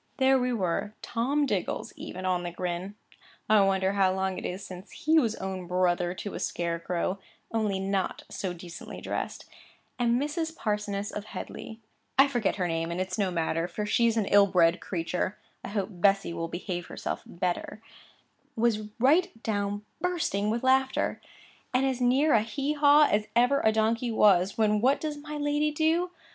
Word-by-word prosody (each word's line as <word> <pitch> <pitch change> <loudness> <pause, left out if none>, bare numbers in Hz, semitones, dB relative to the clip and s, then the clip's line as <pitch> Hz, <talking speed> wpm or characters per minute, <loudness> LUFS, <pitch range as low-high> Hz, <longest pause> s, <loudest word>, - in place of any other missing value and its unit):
There 265 0 +4
we 250 0 0
were, 205 -1 -1
Tom 275 +5 0
Diggles 205 -9 -2
even 185 +1 -7
on 180 -1 +1
the 175 - -4
grin 180 +3 -4 0.5
(I 215 -1 +6
wonder 195 0 +2
how 195 -2 +3
long 190 -1 -1
it - - -4
is 185 +2 -6
since 185 +1 -9
he 315 +1 +3
was 230 -6 0
own 190 -2 -5
brother 180 0 +1
to 205 - -6
a - - -5
scarecrow, 170 +2 -2 0.3
only 215 -4 0
not 195 0 -1
so 190 - -4
decently 175 0 -9
dressed) - - -4 0.5
and 240 0 +2
Mrs. 320 +3 -2
Parsoness 210 -1 -2
of 210 - -5
Headleigh,—I 225 +6 -2
forget 240 -7 0
her 180 -3 -1
name, 165 0 -1
and 170 +1 -3
it's 185 +2 -3
no 195 -2 +2
matter, 165 -1 -1
for 210 +3 -4
she's 230 +2 +2
an 215 - +2
ill 200 0 +5
bred 175 -3 +3
creature, 180 +2 -2 0.3
I - - -5
hope 200 -1 -2
Bessy 195 -1 +2
will 165 0 -3
behave 175 0 -5
herself - - -4
better—was 215 +4 -4
right 305 +9 +4
down 205 -1 -2 0.2
bursting 315 - 0
with 230 +3 -1
laughter, 265 0 +2 0.5
and 260 +1 +3
as 260 -2 -1
near 265 +5 +4
a 220 - +5
hee 275 +6 -2
haw 295 0 +6
as 210 0 +1
ever 250 +4 +4
a 220 - +5
donkey 225 +2 +1
was, 195 -4 +4
when 210 -1 +2
what 265 +4 +3
does 305 -1 -3
my 300 0 -6
lady 295 +1 +1
do? 320 +4 +1
210 Hz, 170 wpm, -28 LUFS, 185-255 Hz, 0.5 s, I